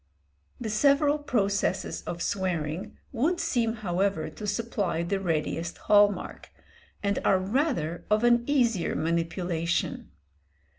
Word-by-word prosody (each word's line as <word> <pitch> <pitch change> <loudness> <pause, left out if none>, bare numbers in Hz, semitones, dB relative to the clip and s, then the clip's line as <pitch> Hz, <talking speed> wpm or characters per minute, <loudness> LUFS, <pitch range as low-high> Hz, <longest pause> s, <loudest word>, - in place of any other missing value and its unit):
The 220 -3 -3
several 285 +6 +3
processes 200 -8 0
of 175 0 -3
swearing 175 -3 -2
would 305 +8 0
seem 240 -9 0
however 195 -4 -1
to 210 - -7
supply 205 -5 -1
the 195 +3 -1
readiest 170 -1 -2
hall 205 -1 +5
mark, 195 - -8 0.5
and 200 0 +1
are 190 - +4
rather 190 - -1
of 215 +2 +3
an 240 0 +4
easier 240 -10 +1
manipulation. 170 +1 -1
200 Hz, 115 wpm, -27 LUFS, 175-235 Hz, 0.5 s, hall